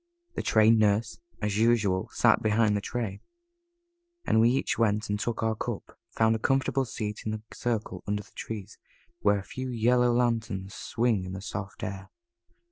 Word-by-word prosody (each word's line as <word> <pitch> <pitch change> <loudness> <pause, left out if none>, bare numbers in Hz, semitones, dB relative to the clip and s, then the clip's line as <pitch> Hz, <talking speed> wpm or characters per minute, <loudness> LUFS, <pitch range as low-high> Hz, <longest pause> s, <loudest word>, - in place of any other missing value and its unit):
The - - -2
Trained 110 +1 +5
Nurse, 110 +2 +1 0.2
as 105 0 0
usual, 110 -5 +2
sat - - +4
behind 110 -1 +3
the 100 - 0
tray, 110 -3 -4 1.0
and 110 - +4
we 115 - +6
each 130 0 0
went 105 -2 +1
and 105 - -1
took 115 0 -2
our 110 0 +2
cup, 110 - -5
found 110 0 +2
a - - -3
comfortable 135 +2 +1
seat 105 -2 -4
in 110 - -2
the 110 0 -6
circle 110 -6 -3
under 105 0 -1
the - - -21
trees, 105 -2 -7 0.4
where 100 0 +3
a 100 - -5
few 130 +5 -6
yellow 125 +1 +3
lanterns 110 -5 0
swung 115 -5 0
in 95 0 -6
the 95 - -5
soft 95 +2 -6
air. 95 -2 -5
110 Hz, 175 wpm, -28 LUFS, 105-115 Hz, 1.0 s, we